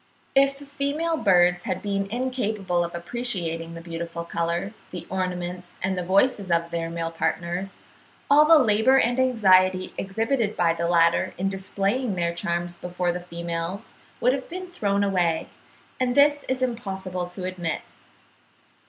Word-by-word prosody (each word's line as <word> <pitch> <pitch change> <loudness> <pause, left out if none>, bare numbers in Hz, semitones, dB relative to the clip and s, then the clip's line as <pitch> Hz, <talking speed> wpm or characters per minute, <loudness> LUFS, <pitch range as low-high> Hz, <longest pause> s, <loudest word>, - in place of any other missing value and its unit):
If 275 0 +4
female 285 +4 -2
birds 175 - +3
had 185 - -3
been 200 -1 -1
incapable 215 -7 -1
of 170 0 -5
appreciating 170 -4 -3
the 165 - -7
beautiful 170 0 -5
colours, 170 +5 -3
the 180 - -7
ornaments, 180 -1 -4
and 190 0 0
voices 195 +3 +2
of 170 0 +1
their 165 -1 -2
male 165 0 -3
partners, 170 +4 -2 0.5
all 295 +2 +7
the 325 +1 +8
labour 245 0 +4
and 245 -1 +2
anxiety 185 -7 +4
exhibited 220 +3 -1
by 170 -1 +3
the 170 0 -2
latter 170 +2 +3
in 190 +2 0
displaying 195 +4 -1
their 170 -1 0
charms 170 +1 -2
before 180 0 -2
the 175 - -4
females 170 +3 -5 0.3
would 250 +2 +3
have 265 -1 -4
been 370 +1 -6
thrown 200 - 0
away; 180 -5 +1 0.5
and 250 -1 +1
this 290 0 +5
it - - -13
is 260 0 0
impossible 190 -7 -3
to 180 +1 -8
admit. 180 -3 -3
185 Hz, 150 wpm, -25 LUFS, 170-240 Hz, 0.5 s, the